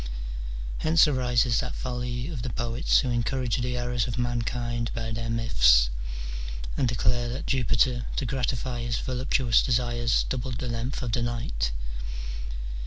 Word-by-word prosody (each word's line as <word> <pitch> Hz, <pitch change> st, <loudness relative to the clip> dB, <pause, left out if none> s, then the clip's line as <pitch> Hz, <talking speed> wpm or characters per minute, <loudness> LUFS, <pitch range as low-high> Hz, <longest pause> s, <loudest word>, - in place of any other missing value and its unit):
Hence 160 Hz, 0 st, +5 dB
arises 125 Hz, -4 st, +2 dB
that -, -, -3 dB
folly 125 Hz, 0 st, -3 dB
of 145 Hz, -7 st, -4 dB
the 125 Hz, -, -3 dB
poets 120 Hz, +4 st, +1 dB
who 130 Hz, -3 st, -1 dB
encourage 120 Hz, +1 st, 0 dB
the 125 Hz, 0 st, -1 dB
errors 120 Hz, -1 st, 0 dB
of 120 Hz, 0 st, -3 dB
mankind 120 Hz, -1 st, -1 dB
by 115 Hz, 0 st, -3 dB
their 115 Hz, +1 st, -3 dB
myths, -, -, +5 dB, 0.8 s
and 130 Hz, -, +2 dB
declare 120 Hz, 0 st, +1 dB
that 125 Hz, +3 st, -4 dB
Jupiter 125 Hz, -1 st, +2 dB
to 140 Hz, -, 0 dB
gratify 125 Hz, -1 st, -1 dB
his 120 Hz, -1 st, -1 dB
voluptuous 125 Hz, -2 st, +2 dB
desires 120 Hz, -2 st, +2 dB
doubled 130 Hz, -1 st, -2 dB
the 125 Hz, -, -3 dB
length 120 Hz, +3 st, -3 dB
of 120 Hz, -, -2 dB
the 120 Hz, -, +1 dB
night. 115 Hz, -, -1 dB
120 Hz, 145 wpm, -27 LUFS, 115-125 Hz, 0.8 s, Hence